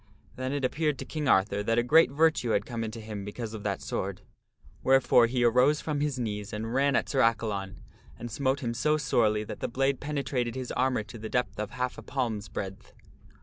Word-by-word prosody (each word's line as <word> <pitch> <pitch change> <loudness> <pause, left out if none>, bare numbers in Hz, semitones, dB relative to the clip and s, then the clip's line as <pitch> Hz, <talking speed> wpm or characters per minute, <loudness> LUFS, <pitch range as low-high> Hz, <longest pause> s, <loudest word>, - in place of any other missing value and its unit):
Then 130 0 -3
it 140 -2 -1
appeared 150 +1 0
to - - -6
King 155 -2 -3
Arthur 100 -3 +3
that 115 +2 0
a 120 - +4
great 155 +4 +6
virtue 155 -3 +2
had 100 - +1
come 115 -2 -4
into 110 +1 -5
him 105 -2 -6
because 110 +2 -6
of 110 - -6
that - - -3
sword. - - -4 0.6
Wherefore 130 -3 +5
he 125 +1 0
arose 125 +5 +4
from 150 -2 -2
his 145 -3 -1
knees 105 -4 -3
and 110 +2 -4
ran 140 +1 +3
at - - +1
Sir 135 - -1
Accalon 100 -5 0 0.3
and 120 - -7
smote 135 +4 0
him 120 -3 -2
so 150 +6 +2
sorely 110 -7 +2
that - - -7
the - - -2
blade 135 +2 0
penetrated 140 -5 -2
his 130 -1 -4
armor 130 -3 +1
to 110 +2 -11
the 110 +1 -6
depth 115 -5 -1
of 105 -1 -2
half 125 +1 -3
a - - -8
palm's 115 -7 -3
breadth. 95 -1 -6
120 Hz, 215 wpm, -28 LUFS, 110-135 Hz, 0.6 s, great